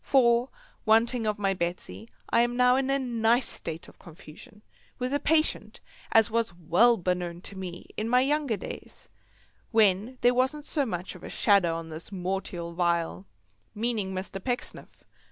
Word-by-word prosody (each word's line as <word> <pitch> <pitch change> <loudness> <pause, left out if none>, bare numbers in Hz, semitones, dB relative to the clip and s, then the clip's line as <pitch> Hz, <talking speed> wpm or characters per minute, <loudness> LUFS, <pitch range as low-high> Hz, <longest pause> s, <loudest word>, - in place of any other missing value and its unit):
For, 240 -1 +3 0.3
wanting 225 +1 +3
of 210 0 0
my 195 -1 +1
Betsy, 170 - -4 0.2
I 230 - +5
am 240 +1 0
now 250 0 +5
in 270 0 0
a 275 - +3
nice 240 -1 +1
state 165 +1 -6
of - - -17
confusion, 175 +6 -14 0.3
with 255 +1 -2
a 285 - +2
patient 310 +2 0 0.3
as 225 -1 +4
was 225 -5 0
well 180 +8 +4
beknown 180 -1 -2
to 200 - -3
me 180 -2 -7
in 220 +2 -2
younger 270 -1 +2
days, - - -9 0.6
when 220 +2 +2
there 245 0 +5
wasn't 265 +4 0
so 285 -4 0
much 180 -3 -4
of 180 - -13
a - - -7
shadder 200 -5 +3
on 165 0 -5
this 160 +1 -8
mortial 180 -2 -3
vial, 170 - -1 0.5
meaning 215 -3 -1
Mr. 190 0 -5
Pecksniff. 245 0 -5
215 Hz, 160 wpm, -27 LUFS, 175-245 Hz, 0.6 s, I